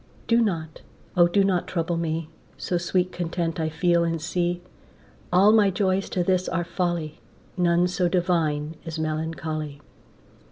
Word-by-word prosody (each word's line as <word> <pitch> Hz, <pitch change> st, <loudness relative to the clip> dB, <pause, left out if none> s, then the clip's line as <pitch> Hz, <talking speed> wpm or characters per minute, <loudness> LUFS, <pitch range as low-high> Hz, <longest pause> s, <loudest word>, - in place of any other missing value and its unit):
Do 230 Hz, 0 st, +3 dB
not, 165 Hz, -7 st, -2 dB, 0.3 s
O 175 Hz, -1 st, +6 dB
do 195 Hz, +3 st, +3 dB
not 185 Hz, -3 st, +1 dB
trouble 170 Hz, -1 st, -1 dB
me, 165 Hz, -1 st, -2 dB, 0.3 s
So 175 Hz, -, -1 dB
sweet 180 Hz, +1 st, 0 dB
content 170 Hz, -1 st, -2 dB
I 160 Hz, -1 st, 0 dB
feel 170 Hz, +2 st, +2 dB
and 165 Hz, -1 st, -1 dB
see. 175 Hz, +2 st, -1 dB, 0.7 s
All 190 Hz, +4 st, +6 dB
my 215 Hz, -2 st, +5 dB
joys 190 Hz, 0 st, 0 dB
to 180 Hz, -, 0 dB
this 185 Hz, 0 st, +1 dB
are 175 Hz, 0 st, 0 dB
folly, 170 Hz, -3 st, -2 dB, 0.4 s
None 175 Hz, 0 st, +3 dB
so 180 Hz, 0 st, 0 dB
divine 165 Hz, -4 st, 0 dB
as 165 Hz, -1 st, -6 dB
melancholy. 155 Hz, -1 st, -3 dB
175 Hz, 150 wpm, -25 LUFS, 160-180 Hz, 0.7 s, O